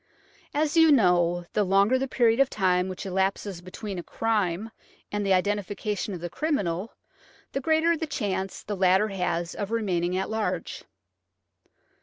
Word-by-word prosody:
As 300 +1 +1
you 325 -1 +6
know, 175 -7 +3
the 210 - +2
longer 200 +6 +3
the 270 - -1
period 235 -2 +2
of 275 -1 +4
time 185 -2 +1
which 185 - -6
elapses 190 -1 -1
between 185 +1 -6
a - - -6
crime 215 -1 -1 0.4
and 205 0 -1
the 195 - 0
identification 205 +1 -1
of 170 - -8
thc 175 -1 -5
criminal, 205 - -2 0.6
the 275 - -2
greater 320 +3 +3
chance 195 - -3
the 205 - -4
latter 190 +3 +3
has 175 -3 -2
of 205 -2 -4
remaining 185 -6 0
at 190 - -1
large. 185 -6 -3
195 Hz, 150 wpm, -26 LUFS, 180-225 Hz, 0.6 s, you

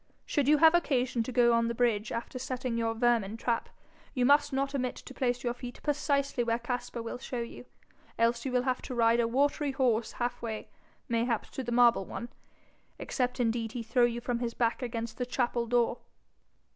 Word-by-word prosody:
Should 285 -4 0
you 300 +1 +6
have 320 +2 +7
occasion 255 -8 +1
to 225 - -3
go 240 -1 +4
on 230 0 +3
the 235 - -2
bridge 225 -3 +1
after 235 +2 -4
setting 255 -1 -3
your 225 -1 0
vermin 225 -3 +1
trap, 230 0 -1 0.5
you 250 -1 +2
must 290 +2 +4
not 275 +1 -1
omit 255 -2 -1
to - - -11
place 245 -2 -1
your 240 -1 0
feet 245 0 -9
precisely 280 -3 0
where 230 0 +1
Caspar 240 -1 -4
will 230 - -5
show 250 -2 -4
you, 235 +1 -8 0.5
else 235 +1 +2
you 265 - -3
will 250 0 +2
have 255 -1 0
to 255 - -6
ride 230 0 +4
a 235 - +3
watery 285 +3 +1
horse 240 -4 +1
half 240 0 -3
way, 220 -2 -5 0.4
mayhap 235 -1 -1
to 265 - -4
the 240 - -4
marble 235 -4 +4
one 235 - -6 0.7
except 250 -1 -2
indeed 230 -1 0
he 240 - -4
throw 240 +2 +3
you 240 0 -2
from 245 -1 -2
his 235 -1 -3
back 235 +2 0
against 230 -2 -4
the 250 - 0
chapel 240 -2 0
door.' 240 0 +1
240 Hz, 200 wpm, -30 LUFS, 230-255 Hz, 0.7 s, have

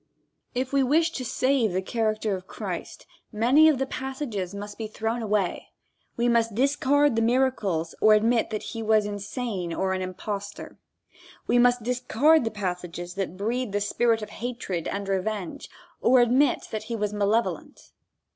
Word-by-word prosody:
If 255 +2 -2
we 275 - +4
wish 320 +6 +3
to 265 - -4
save 255 -3 +1
the 185 - 0
character 215 -1 -1
of 185 0 -9
Christ, - - -6 0.3
many 250 +8 +5
of 300 - +2
the 270 - 0
passages 260 -9 -4
must 205 +1 -7
be 220 - -3
thrown 225 +2 -3
away. 210 -4 -1 0.5
We 240 +1 +2
must 230 -2 +2
discard 280 +1 +3
the 225 - +2
miracles 225 -9 +1
or 215 0 +7
admit 225 +2 +2
that 215 -1 -4
he 225 - -5
was 215 -1 +3
insane 205 -2 -4
or 190 +3 -1
an 185 - -2
impostor. 200 +2 -6 0.7
We 245 - +3
must 245 -1 +4
discard 250 +4 +3
the - - +1
passages 180 -4 -5
that 190 -2 -4
breathe 230 +2 -2
the 205 - +1
spirit 225 +2 +1
of - - -8
hatred 230 -8 -4
and 200 0 -3
revenge, 195 -1 -3 0.3
or 255 +1 +5
admit 250 +4 +3
that 215 -1 -4
he 230 +1 -3
was 210 -1 -2
malevolent. 210 +3 -1
220 Hz, 165 wpm, -26 LUFS, 200-245 Hz, 0.7 s, or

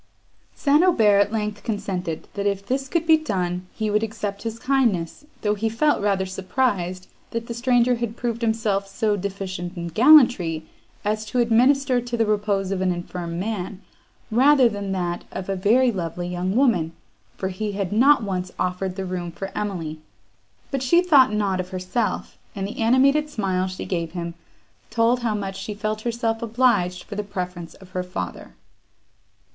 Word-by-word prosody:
St. 295 +3 +3
Aubert 220 - +5
at - - -16
length 210 -1 -2
consented, 185 -6 -3
that, 200 0 -1
if 200 0 -1
this 270 +5 -1
could 330 +4 0
be 320 -1 +6
done, 180 - -2
he 215 -1 -2
would 210 +1 +2
accept 210 -2 -4
his 225 0 -4
kindness, 235 - 0 0.2
though 210 -1 +2
he 215 +2 -1
felt 290 +5 +2
rather 195 -2 +1
surprised, 185 -2 -1 0.2
that 230 0 -4
the 235 - -5
stranger 245 +1 +3
had 235 -1 -4
proved 235 -1 -2
himself 220 -3 0
so 210 +1 0
deficient 190 -2 -5
in 170 0 -4
gallantry, 215 - +5 0.4
as 215 +1 0
to 220 - -4
administer 250 +2 +3
to 240 0 -4
the 225 - +3
repose 205 -2 0
of 190 -1 -1
an 185 -1 +2
infirm 175 -1 -5
man, 195 -2 -3 0.5
rather 265 +2 +6
than 205 -3 -4
to 195 - -3
that 175 -2 -2
of 190 0 -6
a 195 - 0
very 235 +7 +3
lovely 175 -3 -4
young 180 +2 -2
woman, 220 - +2 0.4
for 190 - -2
he 205 +2 -3
had 195 -2 -2
not 260 +3 +5
once 185 -2 -3
offered 180 +1 -2
the 190 -1 -4
room 180 -2 -4
for 195 +3 -7
Emily. 170 -7 -3 0.7
But 270 -2 -1
she 340 +8 +4
thought 280 -10 +6
not 200 -3 0
of 180 0 -3
herself, 185 +4 -3 0.2
and 195 -1 -3
the 210 - -8
animated 275 +6 +4
smile 190 -8 -1
she 185 0 -6
gave 170 -3 -3
him, 170 -1 -4 0.6
told 235 +1 +2
how 230 -3 -1
much 195 -1 -4
she 210 +1 -5
felt 215 +1 -3
herself 230 -1 -1
obliged 220 -6 +1
for - - -9
the 210 +1 -2
preference 180 -4 -6
of 190 - -16
her 185 - -2
father. 180 0 -6
205 Hz, 175 wpm, -23 LUFS, 185-235 Hz, 0.7 s, be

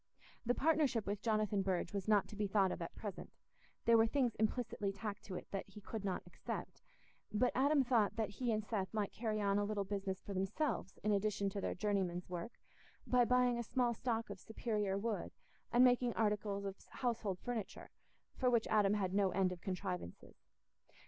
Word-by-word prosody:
The 245 - +3
partnership 285 -7 +2
with 200 0 -2
Jonathan 215 -3 +1
Burge 185 0 -1
was 200 0 -3
not 210 -2 +4
to - - -8
be 210 0 0
thought 195 -2 +3
of - - -4
at 170 - -5
present—there 220 +3 -3
were 225 - +5
things 250 -2 +1
implicitly 220 -2 0
tacked 205 +1 -5
to 190 - -6
it - - -5
that 195 0 -4
he 195 - -11
could 210 +1 -6
not 190 -2 -2
accept; - - -6 0.5
but 230 +4 +2
Adam 280 +2 +4
thought 235 -5 +2
that 220 -3 -1
he 240 +3 -1
and 215 -1 0
Seth 200 -4 -2
might 210 -2 0
carry 220 -2 -1
on 200 0 +2
a - - +1
little 205 -1 -1
business 195 -1 -3
for 200 - -5
themselves 205 +8 -1
in 210 - +2
addition 200 -1 +1
to 200 0 -3
their - - -1
journeyman's 185 -3 -1
work, 180 +6 -4 0.5
by 250 -1 +4
buying 250 0 +3
a - - -1
small 240 +1 +1
stock 230 -2 -2
of 200 - -7
superior 210 -2 -1
wood 215 +1 -2 0.4
and 240 +1 +6
making 245 -1 +4
articles 210 -2 0
of 195 0 -6
household 230 -6 -1
furniture, 235 -1 -5 0.4
for 255 - +2
which 235 -2 +3
Adam 210 -1 +4
had 190 -3 0
no 200 -1 +3
end 185 0 +2
of 180 -2 -7
contrivances. 180 - -5
210 Hz, 190 wpm, -37 LUFS, 195-235 Hz, 0.5 s, and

